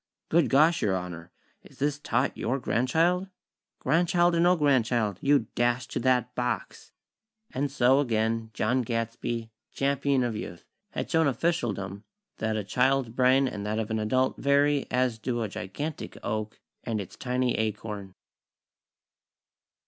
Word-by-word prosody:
"Good 160 -6 +3
gosh, 155 +5 +4
Your 100 -3 +1
Honor!! 90 -1 -6 0.3
Is - - -18
this 145 0 -1
tot 140 -2 0
your 125 +5 -1
grandchild?" 165 +10 +1 0.5
"Grandchild 175 +4 +2
or 170 - +2
no 175 +2 +5
grandchild, 120 - +1
you 140 -4 +3
dash 120 +1 +1
to - - -2
that 125 -1 +1
box!!" 125 0 -3 0.6
And 140 +1 -1
so, 130 0 +4
again, 115 -3 0
John 125 +4 +1
Gadsby, 115 0 -3 0.2
Champion 140 -1 +1
of 120 -2 -1
Youth, 90 -5 -7 0.3
had - - -4
shown 160 -2 +3
officialdom 115 - -1 0.3
that 110 0 -1
a 105 - -2
child's 130 +4 +1
brain 130 +3 +3
and 105 -5 -5
that 105 +1 -1
of 110 -1 -2
an 110 - 0
adult 130 +5 +1
vary 140 0 +2
as 125 -2 0
do 120 +1 -2
a - - -1
gigantic 120 +11 -6
oak 110 -1 -3 0.2
and 110 -2 -2
its 95 - -7
tiny 125 -1 0
acorn. 105 -3 -4
125 Hz, 145 wpm, -27 LUFS, 110-140 Hz, 0.6 s, no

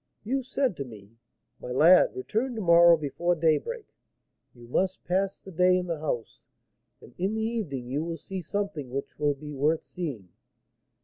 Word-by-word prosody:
You 265 +5 -1
said 260 -3 -1
to 140 - -3
me, 105 -5 -13 0.5
'My - - -8
lad, 165 +8 +6
return 260 - -2
to 220 - -3
morrow 170 -2 +7
before 155 +4 -1
daybreak; 170 - 0 0.7
you 120 -1 -14
must 185 +9 -1
pass 190 +2 0
the 190 - -12
day 180 +1 +4
in 180 - -2
the 165 -3 -3
house, 125 -7 -4 0.5
and 120 - -15
in 195 +4 0
the 220 - -1
evening 190 - -3
you 140 +5 -2
will 165 0 -4
see 190 +5 -6
something 185 -6 -3
which 135 +4 -6
will 145 -1 +2
be 150 +2 -9
worth 150 +4 +1
seeing.' 135 - -6
170 Hz, 175 wpm, -27 LUFS, 140-195 Hz, 0.7 s, morrow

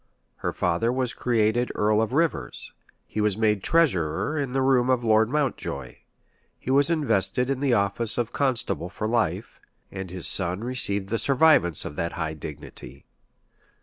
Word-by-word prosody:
Her - - -3
father 115 +8 -1
was 125 -1 -2
created 120 0 0
earl 105 +1 +2
of 110 0 -2
Rivers: 150 - -2 0.3
he 110 - -4
was 105 -2 0
made 105 -2 +1
treasurer 105 - 0
in 140 -4 -3
the 135 +1 0
room 130 -2 +2
of 125 -2 +1
Lord 110 -1 +3
Mountjoy:[*] 145 -2 -3 0.6
he 130 - -5
was 140 +3 +3
invested 125 - 0
in 135 - -2
the 135 -3 +1
office 100 +3 0
of 120 -2 -2
constable 125 - -1
for 100 +3 -6
life; 110 -3 -2 0.3
and 95 -1 -7
his 90 -1 -1
son 95 +2 +5
received 100 -6 0
the 115 +1 -1
survivance 130 - +3
of 75 - -8
that 85 0 -3
high 80 -2 -4
dignity. 75 -3 -10
110 Hz, 160 wpm, -24 LUFS, 95-130 Hz, 0.6 s, son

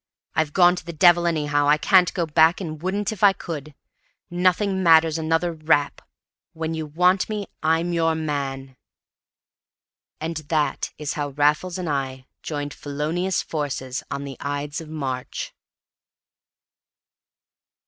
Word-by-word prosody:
I've 155 -2 0
gone 180 +1 +5
to 180 - -6
the 170 +1 -7
devil 175 +2 +5
anyhow. 145 -3 +1
I 150 +1 +5
can't 180 +2 +4
go 175 -3 0
back, 160 +2 +4
and 155 -5 -6
wouldn't 200 +3 -1
if 215 -2 -7
I 200 -1 +7
could. 155 -6 -7 0.6
Nothing 185 +2 +1
matters 165 -2 +5
another 165 +2 0
rap! 155 -2 +1 0.5
When 160 0 -3
you 160 -1 -4
want 180 +6 +2
me, 210 -2 -3 0.2
I'm 165 +2 +1
your 165 -1 +2
man!" 135 -4 -4 1.4
And 160 +1 -3
that 155 -1 -1
is 150 -2 -3
how 145 -1 -3
Raffles 150 +6 +1
and 180 -2 -4
I 135 -3 -3 0.2
joined 145 -2 -4
felonious 155 +6 -2
forces 135 -4 -3
on 140 0 -4
the 140 -1 -7
Ides 145 +1 -3
of 160 - -11
March. 135 -5 -4
160 Hz, 140 wpm, -23 LUFS, 145-175 Hz, 1.4 s, I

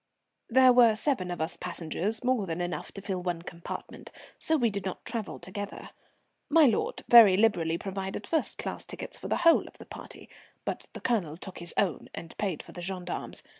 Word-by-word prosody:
There 255 +1 +7
were 235 -3 +6
seven 215 -7 0
of 175 - -4
us 160 +1 -2
passengers, 180 +6 -2
more 250 -6 +1
than 165 +1 -3
enough 175 0 -3
to 195 - -8
fill 190 -3 -2
one 175 -2 -3
compartment, 170 -1 -8 0.3
so 320 - +2
we 235 -5 +2
did 200 -1 -3
not 190 -1 -5
travel 230 -3 -3
together. 200 +3 -7 0.6
My 315 0 +7
lord 230 -6 +1
very 220 -6 +9
liberally 175 -7 +2
provided 195 +2 -5
first 320 - -1
class - - -4
tickets - - -7
for - - -6
the - - +1
whole 335 - +6
of - - -14
the - - -11
party, - - -10 0.4
but - - -4
the - - -8
Colonel 180 -11 0
took 185 +1 -9
his 170 0 -5
own 190 -5 0
and 165 - -8
paid 190 -7 -2
for - - -13
the 175 - -8
gendarmes. 180 -1 -4
195 Hz, 195 wpm, -29 LUFS, 175-230 Hz, 0.6 s, very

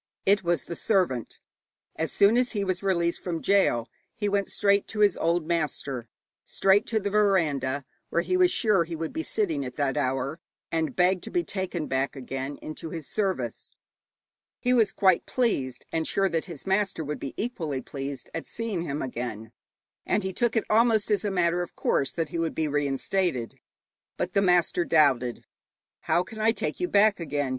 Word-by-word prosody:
It 200 0 +4
was 170 -3 +1
the 170 - -6
servant. 170 - 0 0.6
As 160 +1 -2
soon 200 +3 +5
as 250 0 +1
he 205 -2 0
was 185 -1 -1
released 170 -3 0
from 170 -3 -2
gaol, 175 -14 +2 0.3
he 205 - -1
went 200 -1 +1
straight 200 -1 +2
to 210 - -3
his 205 -3 +5
old 170 0 +1
master, 150 -7 -2 0.4
straight 195 +1 +2
to 225 - +1
the 200 -1 -3
veranda 150 -10 +2 0.2
where 170 - +1
he 365 - 0
was 365 -1 +5
sure 210 - +3
he 165 0 -6
would 160 0 -4
be 320 - -2
sitting 180 - -1
at 125 - -6
that 140 -2 0
hour, 135 +3 -1 0.3
and 160 -1 -1
begged 180 0 +3
to - - -6
be 350 -1 0
taken 185 - -3
back 135 +2 -1
again 135 +1 -5
into 155 +1 -6
his 160 -2 -6
service. 185 - -2 0.9
He 250 - +2
was 225 -4 +4
quite 190 -3 +3
pleased, 140 - -1
and 160 -1 -1
sure 195 -1 +2
that 165 -2 -1
his 170 -6 -9
master 195 -3 0
would 150 0 -4
be 135 - -6
equally 165 - -3
pleased, 140 -1 -6
at 165 - -5
seeing 225 -6 -3
him 150 -3 -3
again, 115 -3 -5 0.5
and - - 0
he 190 0 -3
took 240 +3 +1
it 225 - +1
almost 220 -1 +3
as 205 -3 +2
a 205 - 0
matter 175 -2 +1
of 175 - -6
course 135 - +1
that 165 -3 -2
he 165 - -3
would 165 -1 -1
be 160 - 0
reinstated. 145 -1 -1 0.6
But - - -2
the 200 - +3
master 180 -2 +3
doubted. 135 -7 +2 0.5
'How 175 - +1
can 220 +4 -10
I 220 +1 +3
take - - -3
you 360 - 0
back 205 - +4
again?' 145 -4 -2
170 Hz, 190 wpm, -27 LUFS, 145-200 Hz, 0.9 s, soon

